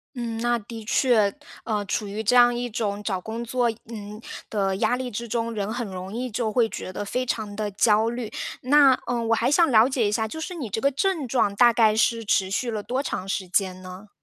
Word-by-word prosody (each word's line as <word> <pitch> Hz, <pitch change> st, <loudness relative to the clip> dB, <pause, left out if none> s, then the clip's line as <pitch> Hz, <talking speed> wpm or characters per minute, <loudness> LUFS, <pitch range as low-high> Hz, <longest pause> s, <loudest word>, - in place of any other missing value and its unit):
嗯， 230 Hz, -2 st, -4 dB
那 240 Hz, +1 st, +1 dB
的 225 Hz, +1 st, -9 dB
确， 220 Hz, -5 st, +3 dB, 0.3 s
嗯， 210 Hz, -3 st, -2 dB
处 205 Hz, +1 st, -2 dB
于 210 Hz, +2 st, -4 dB
这 225 Hz, +3 st, +2 dB
样 245 Hz, 0 st, +6 dB
一 245 Hz, 0 st, -3 dB
种 210 Hz, -2 st, -2 dB
找 190 Hz, -4 st, -2 dB
工 225 Hz, +4 st, -5 dB
作， 240 Hz, 0 st, +1 dB, 0.2 s
嗯， 210 Hz, 0 st, -8 dB, 0.3 s
的 195 Hz, -3 st, 0 dB
压 245 Hz, +5 st, +1 dB
力 255 Hz, -1 st, -4 dB
之 235 Hz, +1 st, -5 dB
中， 230 Hz, +1 st, -2 dB
人 205 Hz, 0 st, -2 dB
很 240 Hz, -1 st, -3 dB
容 185 Hz, 0 st, -7 dB
易 250 Hz, +2 st, -3 dB
就 220 Hz, 0 st, -1 dB
会 230 Hz, +1 st, +3 dB
觉 185 Hz, -, -6 dB
得 205 Hz, -, -4 dB
非 250 Hz, +5 st, -2 dB
常 215 Hz, -3 st, -3 dB
地 210 Hz, 0 st, -3 dB
焦 215 Hz, +2 st, +3 dB
虑。 235 Hz, -2 st, -4 dB, 0.3 s
那， 270 Hz, 0 st, +5 dB
嗯， 235 Hz, -2 st, -1 dB
我 230 Hz, -, +4 dB
还 235 Hz, +3 st, +1 dB
想 330 Hz, 0 st, +4 dB
了 225 Hz, +1 st, +6 dB
解 245 Hz, -6 st, +1 dB
一 -, -, -2 dB
下， 220 Hz, 0 st, 0 dB
就 320 Hz, +9 st, -7 dB
是 360 Hz, +3 st, -5 dB
你 280 Hz, -10 st, -5 dB
这 220 Hz, -, -2 dB
个 280 Hz, -, +3 dB
症 305 Hz, -1 st, -1 dB
状 225 Hz, -5 st, +1 dB
大 240 Hz, +3 st, +6 dB
概 220 Hz, -2 st, +4 dB
是 230 Hz, 0 st, +1 dB
持 190 Hz, -2 st, +1 dB
续 235 Hz, +4 st, -1 dB
了 215 Hz, -2 st, -3 dB
多 255 Hz, +6 st, -2 dB
长 190 Hz, -8 st, -4 dB
时 195 Hz, -1 st, -2 dB
间 185 Hz, 0 st, 0 dB
呢？ 185 Hz, +3 st, -10 dB
225 Hz, 255 characters per minute, -24 LUFS, 205-245 Hz, 0.3 s, 样